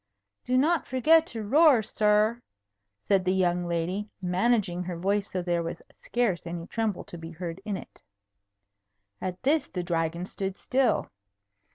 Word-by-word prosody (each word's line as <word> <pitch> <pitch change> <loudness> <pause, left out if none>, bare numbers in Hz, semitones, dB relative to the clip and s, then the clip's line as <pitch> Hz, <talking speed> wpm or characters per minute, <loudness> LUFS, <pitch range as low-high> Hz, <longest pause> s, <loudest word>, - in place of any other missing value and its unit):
"Do 255 +1 +2
not 315 +4 +2
forget 315 +6 +4
to 225 -2 -5
roar, 275 +1 +5
sir," 215 +3 +2 0.7
said 195 -2 +3
the 185 +1 +1
young 175 -1 +1
lady, 175 +5 -2
managing 185 0 +1
her 175 -1 -4
voice 200 +3 0
so 185 -1 -3
there 175 -1 0
was 165 0 -5 0.2
scarce 220 -9 -1
any 170 0 -5
tremble 220 -1 -2
to 175 - -10
be 165 0 -8
heard 170 +2 -6
in 205 -3 -2
it. - - -13 1.2
At 185 +3 -5
this 290 +1 +2
the 180 - -3
Dragon 170 0 -1
stood 195 0 -4
still. 260 0 +1
195 Hz, 155 wpm, -27 LUFS, 175-235 Hz, 1.2 s, roar